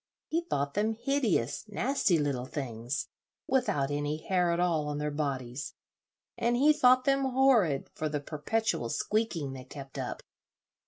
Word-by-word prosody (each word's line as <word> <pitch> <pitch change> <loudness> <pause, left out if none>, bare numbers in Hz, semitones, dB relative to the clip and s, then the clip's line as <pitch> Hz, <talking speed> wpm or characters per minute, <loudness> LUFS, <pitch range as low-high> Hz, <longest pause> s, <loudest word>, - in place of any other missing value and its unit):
He 330 +2 +1
thought 140 0 -1
them 215 +2 +1
hideous, 220 - 0
nasty 210 -3 +1
little 140 -4 -1
things, 125 -2 -4 0.4
without 195 - +1
any 145 +1 -1
hair 180 +1 +1
at 170 - 0
all 165 -4 +1
on 145 0 -2
their 150 0 -2
bodies, 140 -3 -3 0.6
and 240 +1 +2
he 295 +4 +6
thought 255 -3 +5
them 275 0 +3
horrid 250 - +3
for 155 - -2
the 150 0 -1
perpetual 155 - -1
squeaking 175 - -1
they 130 -1 -8
kept 135 0 -9
up. - - -4
155 Hz, 150 wpm, -30 LUFS, 140-235 Hz, 0.6 s, he